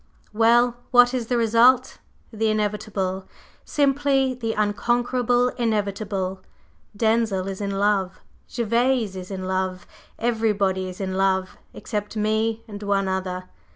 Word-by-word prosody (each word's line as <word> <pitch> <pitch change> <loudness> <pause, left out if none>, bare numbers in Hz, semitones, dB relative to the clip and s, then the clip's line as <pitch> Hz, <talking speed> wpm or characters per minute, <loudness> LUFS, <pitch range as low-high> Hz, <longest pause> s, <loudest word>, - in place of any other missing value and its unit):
Well, 235 +2 +4
what 245 0 +6
is 245 -3 -2
the 245 - +1
result? 235 +3 +4 0.3
The 220 0 0
Inevitable, 205 -3 -2 0.4
simply 275 -2 +1
the 230 -3 -3
unconquerable 245 +3 +1
Inevitable. 200 -4 -2 0.6
Denzil 220 -4 +1
is 195 +1 -5
in 200 - -2
love, 195 -2 +1 0.3
Gervase 235 -2 0
is 185 -1 -7
in 190 -2 -5
love, 185 -1 -2 0.3
everybody 205 -5 0
is 180 - -10
in 190 -1 -3
love, 190 -1 0 0.2
except 210 -1 -5
me 220 +1 0
and 205 -1 -8
one 200 -1 0
other! 185 -1 -3
215 Hz, 120 wpm, -23 LUFS, 190-235 Hz, 0.6 s, what